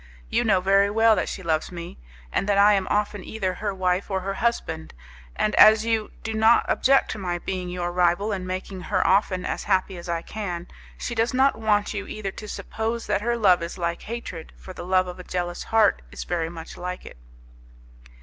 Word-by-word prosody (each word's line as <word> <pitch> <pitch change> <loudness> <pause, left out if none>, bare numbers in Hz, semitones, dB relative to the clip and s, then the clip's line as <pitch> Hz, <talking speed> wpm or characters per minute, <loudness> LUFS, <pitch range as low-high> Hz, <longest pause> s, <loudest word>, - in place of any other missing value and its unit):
You - - +2
know 205 -5 +3
very 195 +1 +4
well 225 +1 +4
that - - -1
she 190 - -6
loves 160 -1 -1
me, 170 - -8 0.3
and 195 - -1
that 200 - +3
I 205 +1 +6
am 195 -2 +1
often 205 -2 0
either 190 -4 -2
her 205 +3 -3
wife 185 0 -1
or 190 -1 -1
her 195 +1 -3
husband, 80 - -2 0.4
and 215 - 0
as 215 +1 +7
you 225 -2 0
do 220 - -3
not 220 +2 +4
object 270 +1 +3
to 220 - -5
my 175 -2 -2
being 180 0 -4
your 175 -1 -3
rival 180 +4 +2
and 185 -2 -3
making 185 0 -5
her 185 0 0
often 190 -1 +2
as - - -3
happy 190 -1 +1
as 175 0 -9
I 170 -1 -1
can, 180 -5 -5 0.3
she 240 - -4
does 230 +2 0
not 270 +2 +4
want 210 -1 +1
you 200 -1 -4
either 200 -2 -4
to 210 - -9
suppose 225 +2 -4
that 205 -1 0
her 235 +2 0
love 190 -6 +4
is 170 +2 -5
like 170 -1 -2
hatred, 215 -8 -7
for 185 - -10
the - - -8
love 185 0 +3
of 180 0 -8
a - - -7
jealous 175 -1 -4
heart 220 -2 +3
is - - -6
very 165 -2 -2
much 165 -1 -9
like 180 +1 -5
it." - - -11
195 Hz, 215 wpm, -24 LUFS, 180-215 Hz, 0.4 s, as